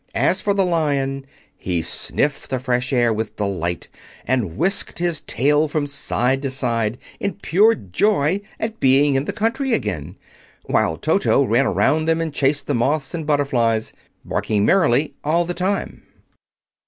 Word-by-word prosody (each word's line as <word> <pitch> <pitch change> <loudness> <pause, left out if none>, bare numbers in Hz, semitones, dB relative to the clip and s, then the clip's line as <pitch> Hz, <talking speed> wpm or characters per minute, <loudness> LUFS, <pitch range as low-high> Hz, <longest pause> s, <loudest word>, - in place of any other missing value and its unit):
As - - +2
for 200 -1 0
the 195 -1 +2
Lion, 140 -5 -1 0.3
he 85 -3 -2
sniffed 145 - -2
the 130 - -1
fresh 125 +1 -1
air 120 -3 +3
with 110 0 -4
delight 90 -5 -3 0.4
and 110 -11 -1
whisked 190 +3 0
his 170 -3 0
tail 145 +6 +2
from 150 0 -1
side 135 -2 0
to 140 - -2
side 120 -4 -1 0.2
in 200 - -2
pure 205 +3 +3
joy 150 - 0 0.2
at 220 0 -4
being 135 +2 +4
in 135 +1 0
the - - -1
country 230 +4 -1
again, 95 - -3 0.5
while - - +1
Toto - - +2
ran - - +2
around 155 +1 +2
them 165 0 +1
and 165 -2 -3
chased 140 0 +1
the 145 - -1
moths 135 +3 0
and 160 -3 -4
butterflies, 120 -7 +1 0.3
barking 105 -2 0
merrily 150 - +3
all 170 +3 +1
the 175 - -3
time. 190 +3 -2
140 Hz, 155 wpm, -21 LUFS, 120-165 Hz, 0.5 s, being